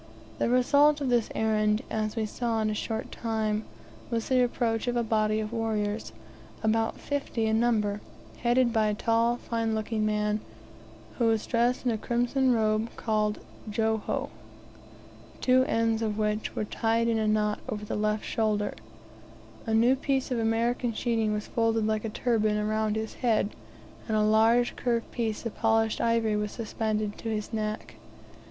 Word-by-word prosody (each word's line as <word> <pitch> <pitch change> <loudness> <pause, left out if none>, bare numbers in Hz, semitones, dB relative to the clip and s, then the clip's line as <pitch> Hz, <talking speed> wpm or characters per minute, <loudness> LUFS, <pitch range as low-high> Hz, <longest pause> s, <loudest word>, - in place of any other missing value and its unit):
The - - +1
result 285 +4 +4
of 275 -3 -1
this 240 -3 +2
errand, 215 +1 +1
as 215 0 -1
we 225 -2 0
saw 230 +1 -2
in 215 0 +1
a - - -1
short 220 +1 -4
time, 220 -2 -1 0.4
was 230 -2 -2
the 255 -1 +4
approach 235 -1 -1
of 245 - 0
a 235 - +2
body 215 -1 +1
of 215 +1 -4
warriors, 220 -2 -2 0.5
about 225 +1 +1
fifty 280 -5 -2
in 220 0 +2
number, 210 -3 +1 0.4
headed 240 0 +2
by 220 -2 +3
a 210 - 0
tall, 230 +2 +2
fine 230 -2 -2
looking 220 0 -1
man, 210 0 +1 0.8
who 235 - +3
was 225 -1 +2
dressed 240 +2 +1
in 245 - +3
a 220 - -2
crimson 245 +3 +1
robe 220 -1 +1
called 215 -1 0 0.3
Joho, 220 0 -1 1.1
two 255 0 +4
ends 225 -1 +1
of 215 -2 -1
which 210 0 -1
were 215 - -1
tied 230 +2 0
in 230 -1 +1
a 215 - 0
knot 210 0 +1
over 210 0 -4
the - - -3
left 215 0 0
shoulder; 210 -2 0 0.9
a 220 - 0
new 240 +4 +5
piece 270 -1 -1
of 245 - 0
American 230 +2 0
sheeting 225 -1 0
was 210 0 -2
folded 225 -1 +1
like 215 -1 0
a 225 - -2
turban 215 -2 +1
around 215 0 0
his 220 0 -3
head, 220 -4 +2 0.6
and 220 -2 +1
a 215 - +3
large 225 +3 +4
curved 235 -2 -1
piece 225 -2 -2
of 230 - -4
polished 225 -1 +2
ivory 230 -2 +2
was 210 0 -2
suspended 215 -2 -2
to 225 - -4
his 215 +1 -3
neck. 215 -1 -3
225 Hz, 170 wpm, -28 LUFS, 215-235 Hz, 1.1 s, new